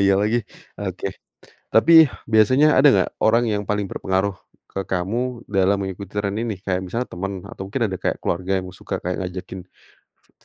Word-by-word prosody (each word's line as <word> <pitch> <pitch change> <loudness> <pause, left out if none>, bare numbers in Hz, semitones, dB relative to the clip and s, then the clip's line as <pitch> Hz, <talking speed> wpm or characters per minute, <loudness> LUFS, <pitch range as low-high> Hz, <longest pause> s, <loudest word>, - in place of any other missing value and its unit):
Iya 100 0 +5
lagi. 110 +3 +2 0.4
Oke. - - -4 0.7
Tapi, 140 +9 +5 0.4
biasanya 130 +7 +5
ada 140 +2 +7
nggak, - - +2 0.2
orang 115 +2 +4
yang 105 0 -1
paling 105 -1 0
berpengaruh 95 +1 -1 0.4
ke 95 - -3
kamu 115 +7 -2
dalam 100 0 +2
mengikut 95 +1 -5
tren 100 -1 -1
ini? 115 -2 -2
Kayak 95 -1 0
misalnya 115 +7 -3
teman, 100 +2 -4 0.2
atau - - -8
mungkin 120 +4 -2
ada 95 - -3
kayak - - 0
keluarga 90 +2 -1
yang 90 0 -6
suka - - -5
kayak 90 0 -2
ngajakin 90 +1 -7 0.4
te - - -37
100 Hz, 170 wpm, -22 LUFS, 95-115 Hz, 0.7 s, ada